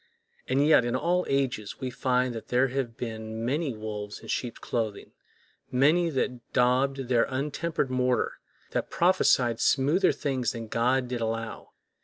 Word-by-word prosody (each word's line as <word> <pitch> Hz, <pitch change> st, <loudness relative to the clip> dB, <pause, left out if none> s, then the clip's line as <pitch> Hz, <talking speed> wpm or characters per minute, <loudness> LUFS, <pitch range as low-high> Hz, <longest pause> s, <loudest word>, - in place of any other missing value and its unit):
And 135 Hz, +3 st, +2 dB
yet, 155 Hz, -5 st, +6 dB
in 120 Hz, +1 st, -1 dB
all 175 Hz, +7 st, +1 dB
ages, 130 Hz, -7 st, -1 dB
we 130 Hz, -2 st, -3 dB
find 125 Hz, 0 st, 0 dB
that 110 Hz, -1 st, -7 dB
there 125 Hz, +2 st, +2 dB
have 125 Hz, -3 st, -3 dB
been 110 Hz, -1 st, -5 dB
many 140 Hz, 0 st, -1 dB
wolves 105 Hz, -1 st, -6 dB
in -, -, -12 dB
sheep's 120 Hz, -2 st, -2 dB
clothing, 110 Hz, -4 st, -3 dB, 0.6 s
many 155 Hz, +7 st, +3 dB
that 125 Hz, -4 st, -3 dB
daubed 130 Hz, +2 st, +3 dB
with 130 Hz, -2 st, -6 dB
untempered 140 Hz, +4 st, 0 dB
mortar, 125 Hz, -1 st, 0 dB, 0.3 s
that -, -, -2 dB
prophesied 130 Hz, -10 st, +3 dB
smoother 150 Hz, +8 st, +3 dB
things 135 Hz, -3 st, -1 dB
than 115 Hz, -2 st, -7 dB
God 125 Hz, +3 st, +1 dB
did 120 Hz, -1 st, -3 dB
allow. 115 Hz, 0 st, -4 dB
125 Hz, 150 wpm, -27 LUFS, 115-135 Hz, 0.6 s, yet